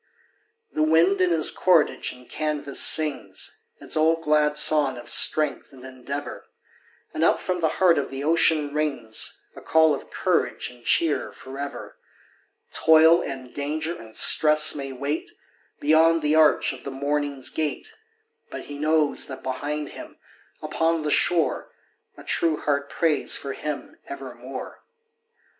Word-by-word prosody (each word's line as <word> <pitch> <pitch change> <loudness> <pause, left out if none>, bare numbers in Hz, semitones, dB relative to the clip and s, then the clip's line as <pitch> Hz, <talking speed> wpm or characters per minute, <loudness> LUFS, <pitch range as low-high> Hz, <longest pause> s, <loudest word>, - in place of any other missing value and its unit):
The - - -2
wind 165 +5 +3
in 185 - +3
his 165 -3 +4
cordage 175 -5 +1
and 125 -1 -16
canvas 150 -2 -1
sings 155 -3 +1 0.2
Its - - -1
old 160 +1 +1
glad 150 -1 +2
song 145 -4 +3
of 120 - -11
strength 155 -2 +2
and 130 -2 -15
endeavor, 130 +2 -7 0.7
And - - -2
up - - +3
from 180 -1 -3
the 165 - +1
heart 175 -5 +4
of 140 - -4
the 135 +1 -6
ocean 155 -2 +2
rings 145 -7 -2
A - - -11
call 160 -1 +3
of 140 - -7
courage - - -2
and 120 -1 -19
cheer 160 +3 +1
forever; 140 +2 -9 0.7
Toil 160 +1 +5
and 130 -2 -7
danger 155 +4 -3
and 110 -5 -13
stress 155 0 +5
may 135 -2 -6
wait 140 +4 -4 0.5
Beyond 160 +2 +3
the 150 0 +1
arch 155 -1 +3
of - - -12
the - - -6
morning's 140 0 -2
gate, 160 - -4 0.6
But - - -7
he 145 0 -9
knows 155 0 +1
that 130 - -9
behind 145 +3 -4
him, - - -11 0.5
upon 165 -1 -1
the 150 - -2
shore, 170 +1 +1 0.5
A - - -12
true 160 -2 0
heart 140 -1 -2
prays 160 -3 +1
for 140 - -6
him 150 - -7
evermore. 345 0 -9
150 Hz, 145 wpm, -23 LUFS, 140-160 Hz, 0.7 s, Toil